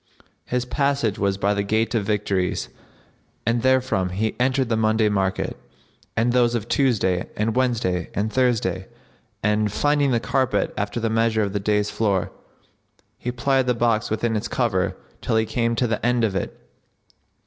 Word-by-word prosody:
His 125 0 -1
passage 140 -5 0
was 100 -1 +1
by 100 +1 +1
the 100 - 0
Gate 110 +4 0
of 105 -4 0
Victories[FN#63] 100 -3 -1 0.8
and 115 0 +1
therefrom 130 -8 +2
he 105 +4 -2
entered 130 +1 +2
the 115 - +1
Monday 110 0 +2
market, 95 -2 -1 0.6
and 120 +2 +2
those 120 -1 +3
of 115 -1 -3
Tuesday 105 -11 +1
and 110 +1 0
Wednesday 115 -9 0
and 110 +2 -1
Thursday,[FN#64] 110 -8 +1 0.6
and, 105 0 +1
finding 145 +4 +2
the 120 -3 +2
carpet 125 -4 0
after 105 +3 -2
the 115 -1 -1
measure 115 -1 +2
of 100 -1 -3
the 105 - 0
dais 105 +1 0
floor,[FN#65] 100 -5 0 0.9
he 125 - -3
plied 130 +2 +1
the 125 - +2
box 115 -2 +1
within 110 +1 0
its 110 +1 -2
cover 100 -6 0 0.2
till - - -1
he 110 0 +3
came 115 +1 0
to 125 - +1
the 110 -2 -2
end 120 0 +2
of 105 -4 +1
it. - - -3
110 Hz, 170 wpm, -23 LUFS, 100-125 Hz, 0.9 s, those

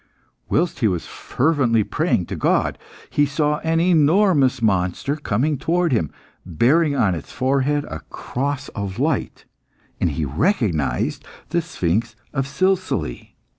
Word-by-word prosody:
Whilst 170 -4 +1
he 115 - +3
was 90 -4 -1
fervently 130 -6 +1
praying - - 0
to - - -5
God, - - +1 0.3
he 145 0 +3
saw 150 +1 0
an 165 0 0
enormous 165 -4 +4
monster 100 +5 0
coming 145 +1 -1
towards 170 -1 +1
him, 80 -10 +1 0.3
bearing 140 - +2
on 105 -8 +2
its 80 - -7
forehead 140 +2 +1
a 80 - -6
cross 140 +2 -3
of 100 -2 -5
light, - - -1 0.5
and - - +2
he 75 +1 -2
recognised 80 - 0 0.3
the 170 +2 +1
sphinx 110 - -1 0.2
of 135 -2 -1
Silsile. 185 +4 -1
135 Hz, 130 wpm, -21 LUFS, 100-160 Hz, 0.5 s, enormous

